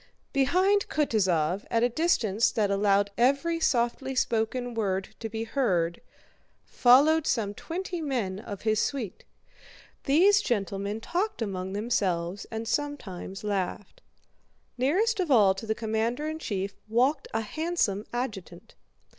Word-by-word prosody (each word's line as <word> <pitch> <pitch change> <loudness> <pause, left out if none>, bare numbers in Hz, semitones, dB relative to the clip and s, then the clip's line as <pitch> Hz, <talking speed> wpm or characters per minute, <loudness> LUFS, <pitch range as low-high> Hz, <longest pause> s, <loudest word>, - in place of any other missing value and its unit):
Behind 370 +9 +2
Kutúzov, 190 - +1
at 230 0 +1
a - - +5
distance 230 - +2
that 205 -3 0
allowed 200 0 +2
every 280 +7 +2
softly 260 -1 0
spoken 245 +1 0
word 195 -4 -1
to 225 - -5
be 220 +1 -4
heard, 185 -9 0 0.6
followed 290 +6 +4
some 210 -4 0
twenty 350 - -5
men 235 -11 -2
of 205 -2 -8
his 215 -1 +2
suite. 235 -9 -3 0.8
These 380 +9 +5
gentlemen 200 - -2
talked 375 - -2
among 190 -2 -4
themselves 200 -4 -1
and 225 0 -5
sometimes 220 -9 -4
laughed. 200 -1 -3 0.7
Nearest 390 - +1
of 360 -4 0
all 210 -8 +6
to 195 +3 -8
the 220 - 0
commander 225 +6 -1
in 315 0 -4
chief 200 -7 -3
walked 260 +6 +1
a 225 - -1
handsome 225 - -1
adjutant. 240 -7 -5
225 Hz, 130 wpm, -27 LUFS, 200-280 Hz, 0.8 s, all